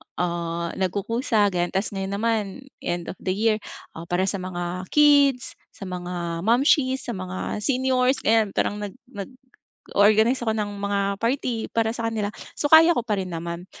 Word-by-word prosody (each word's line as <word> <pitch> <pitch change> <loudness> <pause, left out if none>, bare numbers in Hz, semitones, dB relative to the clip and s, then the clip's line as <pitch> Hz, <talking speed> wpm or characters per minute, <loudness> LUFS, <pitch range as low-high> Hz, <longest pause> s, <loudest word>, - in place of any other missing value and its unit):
ah, 170 -1 -2
nagkukusa 205 +3 +1
ganiyan. 175 -1 -1
Tas 195 +2 0
ngayon 195 0 -3
naman 220 0 +1 0.4
end 175 -1 -3
of - - -13
the 185 -1 -2
year, 215 +1 +2 0.3
ah, 165 +1 -9
para 175 +2 +1
sa 195 +1 -1
mga 180 0 -4
kids, 285 -3 +4 0.2
sa - - -9
mga 175 -2 -4
momshies, 260 +2 +3
sa 240 - -4
mga 185 +1 -4
seniors, 260 +2 +1
ganiyan, 220 -2 +2
parang 205 - 0
nag 205 -2 -5 0.2
nag-o-organize 220 0 0
ako 220 - +1
ng 205 -1 -2
mga 200 0 0 0.2
party 235 -1 -1
para 225 0 +1
sa 230 -1 -1
kanila. 215 -2 -2 0.3
So - - -2
kaya 325 +2 +8
ko - - +1
pa 210 -3 0
rin 185 - -6
naman, 170 +1 -5
205 Hz, 165 wpm, -24 LUFS, 185-240 Hz, 0.4 s, kaya